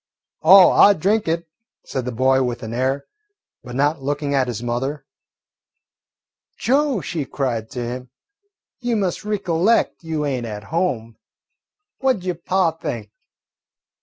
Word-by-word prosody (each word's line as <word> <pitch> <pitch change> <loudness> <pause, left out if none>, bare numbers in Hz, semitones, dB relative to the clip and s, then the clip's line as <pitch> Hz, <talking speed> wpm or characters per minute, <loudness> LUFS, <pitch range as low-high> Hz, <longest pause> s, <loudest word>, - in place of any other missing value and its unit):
"Oh, 185 +4 +8
I 205 - +7
drink 200 +4 +1
it," 165 +1 -1 0.4
said 130 -2 -4
the 125 - -2
boy 130 +3 +2
with 125 -1 -2
an 110 +1 -5
air, 130 +3 -1 0.6
but 125 -1 -8
not 145 +2 +1
looking 145 +1 -2
at 135 -2 +2
his 120 -1 -4
mother. 135 +4 -3 1.5
"Joe," 270 -2 +1
she 155 +1 -3
cried 120 -5 -3
to 125 - -4
him, 125 +1 -6 0.7
"you 240 -2 -1
must 195 -3 -1
ricollect 205 -1 +1
you 160 -2 -2
ain't 130 -4 -2
at 105 -1 -6
home. 120 -11 -1 0.8
What 265 -1 +3
'ud 185 - -10
yo' 185 -1 -1
pa 175 +1 +1
think?" 115 -9 -6
145 Hz, 140 wpm, -21 LUFS, 125-180 Hz, 1.5 s, Oh